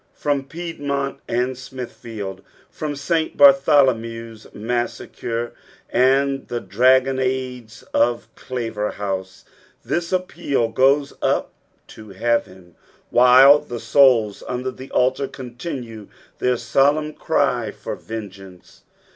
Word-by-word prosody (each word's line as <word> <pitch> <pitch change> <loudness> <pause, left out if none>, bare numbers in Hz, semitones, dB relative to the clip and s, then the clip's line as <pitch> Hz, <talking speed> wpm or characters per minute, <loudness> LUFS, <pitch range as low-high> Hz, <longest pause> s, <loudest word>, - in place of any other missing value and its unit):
From 140 -2 -1
Piedmont 140 -3 -4
and 125 +2 -1
Smitfafield, 120 -6 -7 0.3
from 150 -2 -4
St. 160 +3 -1
Bartholomew's 130 -6 +3
massacre 120 +1 -3 0.4
and 135 +2 +2
the 120 - -3
dragoonades 130 -1 +1
of 120 0 +1
Claverhouse, 105 -6 -4 0.4
this 170 -1 -2
appeal 175 -9 -1
goes 140 +4 +2
up - - 0 0.4
to 110 -1 -12
heaven,, 95 -4 -2 0.4
white 130 +4 +7
the 120 -1 -4
souls 115 -3 +4
under 125 +1 -3
the 130 +1 -11
altar 130 +2 +1
continue 120 -4 -7 0.3
their 125 -1 +1
solemn 145 +6 +1
cij - - 0
for - - -6
vungeance. 95 -4 -10
125 Hz, 95 wpm, -21 LUFS, 115-140 Hz, 0.4 s, white